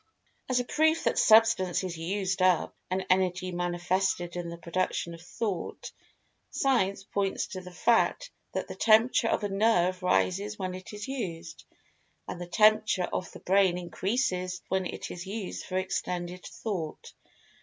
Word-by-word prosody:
As 255 -1 +2
a - - 0
proof 315 +4 +2
that - - +1
Substance 220 -5 +5
is 180 -2 -4
"used 185 +3 -2
up," 185 -2 +3
and 185 +1 -1
Energy 185 0 +1
manifested 175 0 -1
in 175 -1 -4
the 170 - -7
production 170 0 -2
of 165 - -11
Thought, 190 +1 -4 0.6
Science 200 -8 +1
points 195 0 -1
to 185 - -6
the 180 - -10
fact 235 - +1 0.2
that - - -2
the - - -6
temperature 230 +2 +4
of 225 - 0
a 205 - -1
nerve 195 -3 +2
rises 195 +3 +1
when 185 -2 -3
it 185 0 -9
is 210 -1 -6
used, 175 -11 -5 0.6
and 175 - -6
the 175 - -5
temperature 215 -1 +3
of 185 - -3
the - - -12
Brain 190 -1 +3
increases 185 0 -2
when 190 -1 0
it - - -6
is 180 +1 -7
used 200 -1 -5
for 185 - -2
extended 180 -1 -3
Thought. 180 -8 -5
185 Hz, 155 wpm, -29 LUFS, 180-210 Hz, 0.6 s, Substance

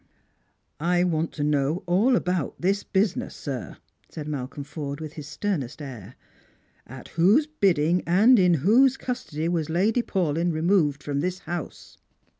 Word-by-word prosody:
" - - -47 0.2
I 175 - +3
want 165 -2 -1
toknow 145 +2 0
all 200 +9 +3
about 180 - -1
this 195 +3 +1
business, 195 -1 -1
sir," 130 -5 -6 0.3
said 150 -2 -7
Malcolm 140 -1 -5
Forde 145 -1 -6
with 155 -1 -7
his 150 -3 -8
sternest 150 - -3
air. 125 -6 -9 0.4
" - - -36 0.3
At 130 0 -11
whose 200 - +4
bidding 180 - +1
and 215 +8 +5
in 180 -2 +4
whose 255 +6 +5
custody 165 -11 -4
was 165 -3 -1
Lady 205 +9 +2
Paulyn 175 -5 0
removed 155 -3 +1
from 140 -1 -2
this 180 +4 -1
house?" 175 -3 -7
170 Hz, 150 wpm, -25 LUFS, 145-190 Hz, 0.4 s, and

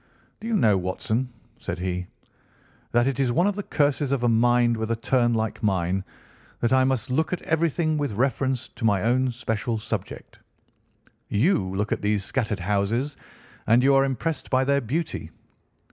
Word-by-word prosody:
"Do 225 - -7
you 230 - +1
know, 105 - +4
Watson," 110 +7 -2 0.3
said 85 - -4
he, 90 0 -3 0.8
"that 120 0 +3
it 135 -1 -1
is 130 -3 +2
one 175 +9 +2
of 205 -1 +1
the 205 - -3
curses 145 -5 0
of 135 -3 0
a - - +3
mind 120 +1 +3
with 110 0 -3
a 115 - +1
turn 120 +1 +1
like 110 -1 -2
mine 95 -2 0 0.6
that 120 +2 +1
I 130 0 +5
must 130 0 0
look 160 +5 +1
at 180 - -3
everything 160 -1 +1
with 145 -6 -1
reference 130 +2 0
to 115 - -11
my 100 -4 +2
own 125 +3 +2
special 115 -1 -2
subject. 110 - -6 0.9
You 100 - +1
look 105 +2 -1
at - - -1
these 105 -1 0
scattered 110 -3 -2
houses, 105 +9 0 0.5
and 115 +3 +5
you 140 +1 +5
are 135 0 +5
impressed 135 +3 -2
by 130 0 +3
their 140 +1 +2
beauty. 155 +7 -3
120 Hz, 175 wpm, -25 LUFS, 105-135 Hz, 0.9 s, I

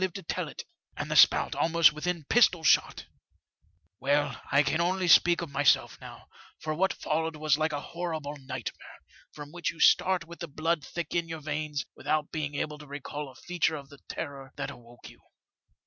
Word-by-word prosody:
e - - +3
to 190 +2 -9
tell - - -3
it, - - -8 0.3
and - - -4
the - - 0
spout - - +6
almost 165 -2 +4
within 170 +2 -3
pistol 185 -8 +4
shot! - - +3 0.9
"Well, 145 +2 0
I 140 +1 +5
can 160 +3 0
only 185 +1 0
speak 175 0 +5
of 160 - -8
myself 140 0 +2
now, - - -11 0.3
for 155 - -3
what 190 +5 +1
followed 160 +1 -2
was 155 -1 +2
like 155 0 +1
a 145 - -2
horrible 160 -4 -4
nightmare, 130 -3 -7 0.3
from 145 -1 -10
which 175 +1 -2
you - - -8
start 185 -1 +4
with 170 +1 -12
the 170 - -5
blood 155 +1 -1
thick 170 -1 -5
in 170 -1 0
your 165 -1 -6
veins, 150 -1 -3
without 155 -1 -1
being 150 -2 -3
able 150 +1 -3
to 150 - -12
recall 145 +1 -6
a 130 - -16
feature 175 +1 -1
of 140 -2 -9
the 140 - -15
terror 140 -4 -6
that 140 0 -4
awoke 120 -2 -14
you. - - -16
155 Hz, 195 wpm, -28 LUFS, 145-170 Hz, 0.9 s, spout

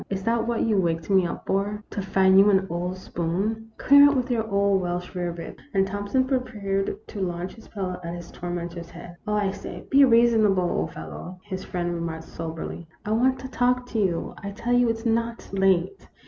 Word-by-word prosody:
" - - -38
Is 195 -1 -3
that 230 +1 +1
what 235 -1 0
you 220 -3 +2
waked 165 +1 -1
me 190 -2 +4
up - - -6
for, 205 +2 -1
to 205 - -3
find 190 0 +4
you 200 +1 +7
an 190 -1 +3
old 180 +2 -2
spoon? 195 +6 -2
Clear 285 +1 +7
out 285 - 0
with 255 -1 0
your 225 -2 0
old 200 -1 +2
Welsh 180 0 -3
rarebits." 175 -2 -5 0.2
And 195 0 +4
Thompson 205 +6 0
prepared 215 -7 -1
to 205 - -5
launch 180 0 -3
his 225 - -15
pillow 185 -3 -4
at 170 +1 -4
his 175 -1 -9
tormentor's 175 -1 -5
head. 175 0 -11
" - - -27
Oh, 210 - +1
I 205 -2 +1
say, - - -8
be 280 +1 +7
reasonable, 230 -6 +5
old 80 - -1
fellow! 175 - -8
" - - -35
his 190 0 -3
friend 175 -1 -2
remarked, 165 -1 -4
soberly. 165 +1 -6
" - - -36
I 210 - -2
want 255 +4 +3
to 260 - -6
talk 250 -1 +1
to 225 - -1
you. 180 -5 0
I 200 - -4
tell 230 +4 -2
you 245 -1 +4
it 225 - 0
's 225 - -11
not 230 0 -1
late. 195 - +1
195 Hz, 220 wpm, -25 LUFS, 175-230 Hz, 0.2 s, you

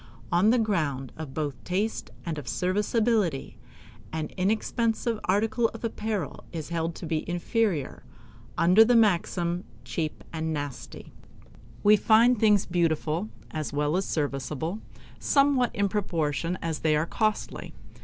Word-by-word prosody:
On 180 +5 +4
the 245 - +4
ground 155 - -1
both 150 -1 -4
of - - -24
taste 200 +5 -2 0.2
and 160 -3 -3
of 135 - -10
serviceability, 205 - 0 0.5
an 155 -1 -3
inexpensive 225 +3 0
article 220 +4 +2
of 225 - -10
apparel 215 -3 -3
is 160 -3 -5
held 165 -1 -2
to - - -7
be 155 -1 -1
inferior, 175 - -1 0.6
under 180 +6 +7
the 240 +2 +3
maxim 175 -4 +2 0.2
"cheap 155 -3 -3
and 160 0 -2
nasty." 145 -3 -6 0.7
We 210 +1 +7
find 230 +3 +5
things 210 -3 +4
beautiful, 170 +2 0 0.2
as 155 -2 -4
well 150 +2 +1
as 190 +1 0
serviceable, 150 +5 -2 0.4
somewhat 275 -4 +3
in 200 0 +2
proportion 170 -4 -1
as 160 -2 -2
they 155 -1 +2
are 150 +2 +1
costly. 215 +4 -2
180 Hz, 135 wpm, -27 LUFS, 155-215 Hz, 0.7 s, under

